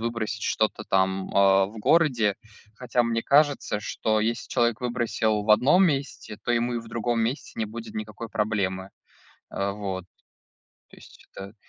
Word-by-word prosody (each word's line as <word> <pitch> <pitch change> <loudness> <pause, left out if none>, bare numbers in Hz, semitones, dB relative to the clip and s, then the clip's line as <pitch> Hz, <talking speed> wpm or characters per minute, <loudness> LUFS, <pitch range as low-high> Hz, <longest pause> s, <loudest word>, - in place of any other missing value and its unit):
выбросить, 115 -1 -3
что-то 110 0 0
там, 95 0 +1
э, - - -10 0.3
в 110 +3 -11
городе, 120 - +3 0.4
хотя 120 +1 0
мне 115 -1 -1
кажется, 145 -7 +2
что 110 +1 -1
если 115 +2 -2
человек 120 -1 +1
выбросил 120 -3 0
в 105 - -1
одном 135 - +5
месте, 135 -7 -3
то - - -3
ему 120 +1 0
и - - -1
в 115 0 -10
другом 115 +1 -1
месте 120 +6 -2
не 110 - -1
будет 115 +2 -9
никакой 110 +1 -6
проблемы, 95 -3 -2 0.6
а, 100 0 -2
вот. 95 -3 -5 0.9
То - - -16
есть - - -17
это 100 +2 -8
110 Hz, 160 wpm, -25 LUFS, 105-120 Hz, 0.9 s, одном